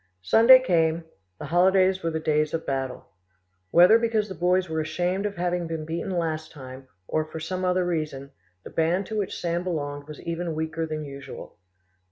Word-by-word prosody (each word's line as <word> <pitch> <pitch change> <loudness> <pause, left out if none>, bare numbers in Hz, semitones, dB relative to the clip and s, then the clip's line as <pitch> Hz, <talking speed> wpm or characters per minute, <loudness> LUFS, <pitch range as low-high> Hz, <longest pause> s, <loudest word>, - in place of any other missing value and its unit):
Sunday 230 - +8
came: 165 -5 +1 0.3
the - - -7
holidays 185 +3 +3
were 165 - -1
the 160 -1 -2
days 155 0 0
of 165 - -4
battle. 135 -5 -4 0.6
Whether 180 - +7
because 225 -2 0
the - - -5
boys 180 +2 +1
were 160 -1 -2
ashamed 180 +5 -1
of 200 - -7
having 175 -1 -1
been 160 -1 -4
beaten 165 +5 -4
last 160 -3 -2
time, 130 -2 -11 0.2
or 155 - 0
for 155 +1 -8
some 185 +4 -4
other 180 0 +1
reason, 150 -5 -3 0.3
the - - -10
band 170 +4 +1
to 220 - -5
which 200 - -3
Sand 170 0 -1
belonged 145 -5 -4
was 150 - -9
even 170 -1 -3
weaker 160 +1 -3
than 155 -1 -4
usual. 140 -1 -10
165 Hz, 185 wpm, -25 LUFS, 155-180 Hz, 0.6 s, Sunday